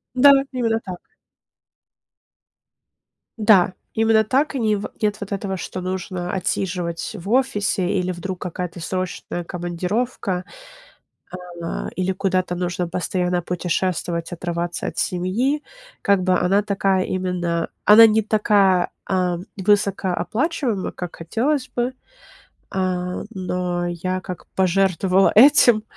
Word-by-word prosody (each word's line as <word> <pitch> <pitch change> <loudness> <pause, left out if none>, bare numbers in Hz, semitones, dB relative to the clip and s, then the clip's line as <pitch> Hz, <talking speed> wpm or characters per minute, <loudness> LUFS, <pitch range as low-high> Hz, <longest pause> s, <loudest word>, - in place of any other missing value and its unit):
Да, 280 +3 +8 0.2
именно 230 -3 0
так. 180 -2 -7 2.4
Да, 200 -4 +5 0.2
именно 220 0 +3
так. 270 +7 +1
И 265 - -1
не 215 -2 +2
в 200 - -4
нет 210 -1 +1
вот 200 - -6
этого, 195 -1 -2
что 185 +1 -6
нужно 185 -1 -4
отсиживать 180 -1 -2
в 195 +3 -8
офисе, 205 -8 +1
или 185 -1 0
вдруг 180 +1 -5
какая-то 180 -1 -5
срочная 180 -1 -4
командировка, 180 +3 -2 1.2
а, 165 - -4
или 185 +1 0
куда-то 185 -2 0
нужно 180 0 -2
постоянно 180 0 -1
путешествовать, 175 -1 -2
отрываться 175 0 -3
от - - -7
семьи. 220 +12 0 0.4
Как 200 -2 +3
бы 185 -1 +2
она 195 +3 +2
такая 195 -2 +1
именно- 175 -2 -2 0.2
она 225 +2 +9
не 220 0 +3
такая, 200 -4 +3 0.2
а, 180 -2 0 0.2
высокооплачиваемая, 205 - 0
как 180 -2 -7
хотелось 255 - -1
бы. 245 +1 0 0.8
А, 180 -1 -2
но 180 -2 -2
я 185 +2 -3
как 180 -1 -8
пожертвовала 190 0 +3
этим, 240 -3 +7
185 Hz, 115 wpm, -22 LUFS, 180-210 Hz, 2.4 s, она